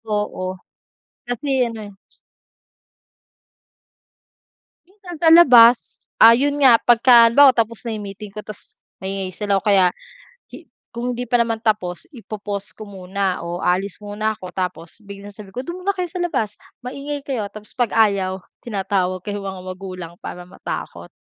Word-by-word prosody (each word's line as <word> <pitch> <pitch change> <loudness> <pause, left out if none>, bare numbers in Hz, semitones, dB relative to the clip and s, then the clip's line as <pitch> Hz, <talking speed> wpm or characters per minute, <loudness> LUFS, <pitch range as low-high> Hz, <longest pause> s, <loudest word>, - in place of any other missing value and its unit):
Oo, 205 -3 -3 0.8
kasi 245 +4 -2
ano 230 -1 -7
eh. - - -16 3.0
Minsan 370 -4 -11
sa 330 - +2
labas. 245 -8 +6 0.2
Ah, 225 - +9
yun 285 +4 +1
nga, 240 -4 +7
pagka 240 0 +6
halimbawa, 270 +4 +7
tapos 230 -2 -1
na 235 - -4
meeting 205 0 -9
ko 210 - -8
tapos 215 -1 -12 0.3
maingay 190 0 -3
sila 200 -2 0
o - - -20
kaya 190 -3 +4 0.6
hi - - -12 0.3
kung 245 +1 -3
hindi 245 +1 -4
pa 245 0 +1
naman 230 -1 +1
tapos, 205 - -1
ipo-pause 205 -4 -7
ko 215 - -9
muna 195 -1 -3
o 175 +1 -5
aalis 190 +3 -1
muna 215 +1 -2
ako. 185 -2 -9
Tapos 180 -2 -5
biglang 200 0 -10
sabi 200 -1 -13
ko, 250 - -4
"Do'n 345 +4 -6
muna 400 +1 +1
kayo 360 -2 -3
sa 365 - -6
labas, 225 -12 -2 0.3
maingay 280 +3 -5
kayo." 250 -7 -3
Tapos 210 +1 -13
'pag 245 -4 -1
ayaw, 195 -4 +1 0.2
tinatawag 190 -4 -2
ko - - -8
yung 200 -1 -5
mga 190 -1 -6
magulang 185 -2 -8
para 180 - -7
matakot. 180 - -7
210 Hz, 155 wpm, -20 LUFS, 195-245 Hz, 3.0 s, Ah